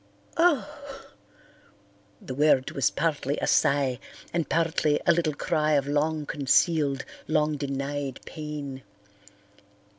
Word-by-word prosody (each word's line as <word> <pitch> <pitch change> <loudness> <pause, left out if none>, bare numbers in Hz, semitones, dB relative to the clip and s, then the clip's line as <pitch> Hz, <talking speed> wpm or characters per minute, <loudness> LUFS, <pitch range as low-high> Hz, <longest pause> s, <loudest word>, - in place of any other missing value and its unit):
"Oh!" 295 -4 0 1.1
The 130 - -7
word 140 -1 +3
was 135 - +2
partly 145 -2 -1
a - - -1
sigh 140 -3 +2 0.3
and 170 -2 -1
partly 160 -2 +1
a - - +6
little 165 -3 +1
cry 155 0 0
of 140 -2 +2
long 150 +1 0
concealed, 140 0 +2 0.2
long 150 -1 +1
denied 140 -1 -3
pain. 150 -4 -6
150 Hz, 110 wpm, -26 LUFS, 140-160 Hz, 1.1 s, a